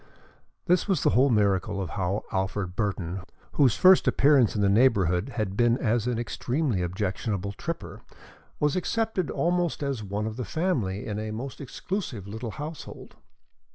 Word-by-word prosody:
This 180 Hz, +1 st, +2 dB
was 190 Hz, -3 st, +1 dB
the 150 Hz, -, +4 dB
whole 135 Hz, +3 st, +4 dB
miracle 100 Hz, -3 st, +1 dB
of 90 Hz, -5 st, -4 dB
how 95 Hz, +1 st, -1 dB
Alfred 95 Hz, -2 st, -2 dB
Burton, 95 Hz, -3 st, -2 dB, 0.3 s
whose 135 Hz, -6 st, +3 dB
first 185 Hz, 0 st, +6 dB
appearance 135 Hz, -6 st, +4 dB
in 105 Hz, -, 0 dB
the -, -, +4 dB
neighborhood 100 Hz, -1 st, +3 dB
had 105 Hz, -4 st, -2 dB
been 120 Hz, +2 st, +3 dB
as 115 Hz, -2 st, 0 dB
an 125 Hz, -2 st, 0 dB
extremely 120 Hz, -, -1 dB
objectionable 95 Hz, +2 st, -2 dB
tripper, 165 Hz, -, -6 dB, 0.6 s
was 150 Hz, -1 st, +1 dB
accepted 205 Hz, -1 st, -1 dB
almost 175 Hz, -3 st, 0 dB
as 135 Hz, -5 st, -2 dB
one 105 Hz, +1 st, -3 dB
of 110 Hz, +1 st, -4 dB
the 125 Hz, -, -2 dB
family 125 Hz, -, -1 dB
in 105 Hz, -3 st, -3 dB
a 110 Hz, 0 st, -4 dB
most 125 Hz, +7 st, -6 dB
exclusive 140 Hz, -, -5 dB
little 110 Hz, +3 st, -5 dB
household. 150 Hz, +6 st, -8 dB
115 Hz, 155 wpm, -27 LUFS, 100-145 Hz, 0.6 s, first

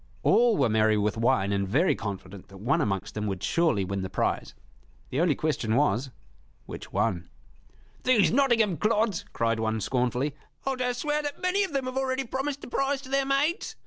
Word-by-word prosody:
All 235 Hz, -2 st, +4 dB
were 135 Hz, -, +3 dB
merry 110 Hz, -1 st, +3 dB
with 105 Hz, 0 st, 0 dB
wine 115 Hz, -3 st, +2 dB
and 100 Hz, -1 st, 0 dB
very 145 Hz, -, +3 dB
confident 100 Hz, -2 st, -7 dB
that 95 Hz, -, -13 dB
one 120 Hz, +8 st, +1 dB
amongst 95 Hz, -2 st, -2 dB
them 105 Hz, 0 st, -3 dB
would 95 Hz, -2 st, -4 dB
surely 160 Hz, -, +2 dB
win 95 Hz, +1 st, -3 dB
the 95 Hz, -, -4 dB
prize. -, -, -2 dB, 0.6 s
The 135 Hz, -, 0 dB
only 170 Hz, -5 st, +3 dB
question 125 Hz, -8 st, -1 dB
was, 130 Hz, -1 st, +1 dB, 0.6 s
Which -, -, -9 dB
one? 90 Hz, -1 st, -1 dB, 0.7 s
"These 240 Hz, -6 st, +4 dB
Nottingham 230 Hz, -, +3 dB
clods!" 215 Hz, -3 st, +1 dB
cried 115 Hz, 0 st, 0 dB
one, 110 Hz, 0 st, 0 dB
scornfully; 125 Hz, +4 st, 0 dB, 0.3 s
"I'll 270 Hz, -1 st, 0 dB
dare 250 Hz, -1 st, -1 dB
swear 295 Hz, +3 st, -1 dB
that 290 Hz, -1 st, -5 dB
many 370 Hz, +2 st, +1 dB
of 375 Hz, -6 st, -4 dB
them 270 Hz, -2 st, -1 dB
have 255 Hz, +1 st, -4 dB
already 265 Hz, 0 st, -1 dB
promised 270 Hz, +3 st, -3 dB
the -, -, -8 dB
prize 275 Hz, +2 st, 0 dB
to 260 Hz, -, -11 dB
their 275 Hz, 0 st, +1 dB
maids! 285 Hz, +5 st, 0 dB
155 Hz, 190 wpm, -27 LUFS, -, 0.7 s, All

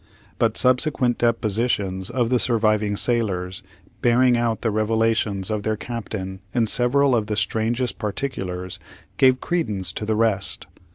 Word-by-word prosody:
But 115 Hz, -1 st, +1 dB
subsequent 125 Hz, -1 st, +2 dB
depositions 105 Hz, -4 st, 0 dB
of 120 Hz, -2 st, -1 dB
the 125 Hz, -, +3 dB
surviving 110 Hz, -3 st, +1 dB
sailors, 95 Hz, -7 st, 0 dB, 0.4 s
bearing 120 Hz, +1 st, +4 dB
out 120 Hz, -2 st, 0 dB
the 115 Hz, -, 0 dB
revelations 110 Hz, -2 st, 0 dB
of 105 Hz, -1 st, -1 dB
their 110 Hz, +1 st, -1 dB
captain 105 Hz, -5 st, -6 dB, 0.2 s
in 120 Hz, -2 st, +3 dB
several 125 Hz, +4 st, +3 dB
of 110 Hz, -3 st, 0 dB
the 105 Hz, -, -2 dB
strangest 115 Hz, +3 st, -1 dB
particulars, 95 Hz, -6 st, -4 dB, 0.4 s
gave 130 Hz, -1 st, +4 dB
credence 105 Hz, -, -1 dB
to -, -, -4 dB
the 110 Hz, -, +1 dB
rest. 110 Hz, -3 st, 0 dB
110 Hz, 135 wpm, -22 LUFS, 105-120 Hz, 0.4 s, bearing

